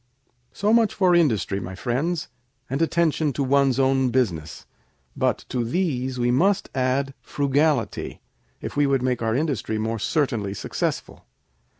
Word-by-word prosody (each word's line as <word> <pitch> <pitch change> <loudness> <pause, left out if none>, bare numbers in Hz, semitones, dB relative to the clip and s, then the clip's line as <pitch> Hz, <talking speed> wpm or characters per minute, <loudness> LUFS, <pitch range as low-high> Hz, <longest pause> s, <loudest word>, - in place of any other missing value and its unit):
"So 210 +2 +1
much 230 -2 +3
for 185 -3 +3
industry, 115 - +2
my 95 0 -7
friends, 140 - -1 0.4
and 135 +4 -1
attention 160 -3 +1
to 140 - -1
one's 135 -1 +2
own 135 -1 +3
business; 85 - -1 0.5
but - - 0
to 125 - -1
these 130 -2 -1
we 120 0 +1
must 195 +10 +2
add 135 +1 0
frugality, 145 +2 0 0.4
if - - -6
we 145 0 +3
would 135 -2 +1
make 125 -2 0
our 115 0 0
industry 130 -7 -1
more 110 +1 -2
certainly 115 -7 -1
successful. 95 - -4
135 Hz, 140 wpm, -24 LUFS, 120-155 Hz, 0.5 s, much